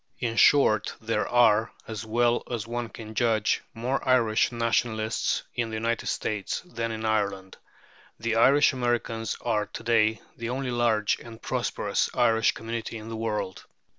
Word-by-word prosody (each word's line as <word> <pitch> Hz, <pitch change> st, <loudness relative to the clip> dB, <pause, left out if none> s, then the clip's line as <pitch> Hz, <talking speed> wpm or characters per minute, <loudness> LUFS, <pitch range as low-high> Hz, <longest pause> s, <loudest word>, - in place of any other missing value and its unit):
In 115 Hz, -2 st, -2 dB
short 110 Hz, -6 st, +4 dB
there 115 Hz, 0 st, -1 dB
are, 115 Hz, -2 st, +4 dB, 0.2 s
as 110 Hz, -1 st, -5 dB
well 120 Hz, +2 st, +2 dB
as 120 Hz, -3 st, -3 dB
one 120 Hz, 0 st, -4 dB
can 110 Hz, -1 st, -9 dB
judge, 110 Hz, -1 st, +1 dB
more 125 Hz, +4 st, -1 dB
Irish 120 Hz, -3 st, +3 dB
nationalists 115 Hz, -1 st, 0 dB
in 120 Hz, -2 st, -2 dB
the 110 Hz, -, -5 dB
United 115 Hz, +1 st, -1 dB
States 105 Hz, -2 st, -2 dB
than 115 Hz, -10 st, -4 dB
in 110 Hz, 0 st, -4 dB
Ireland. 100 Hz, -3 st, -1 dB, 0.6 s
The 115 Hz, 0 st, -1 dB
Irish 140 Hz, +5 st, +5 dB
Americans 120 Hz, -3 st, -1 dB
are 105 Hz, -3 st, 0 dB
to -, -, -8 dB
day 115 Hz, -1 st, +2 dB
the 115 Hz, 0 st, -5 dB
only 130 Hz, 0 st, -2 dB
large 115 Hz, -3 st, +1 dB
and 115 Hz, -1 st, -11 dB
prosperous -, -, -1 dB
Irish 115 Hz, -1 st, +3 dB
community 115 Hz, 0 st, -5 dB
in 110 Hz, +1 st, -9 dB
the 115 Hz, -, -5 dB
world. 105 Hz, -4 st, -3 dB
115 Hz, 155 wpm, -26 LUFS, 110-120 Hz, 0.6 s, Irish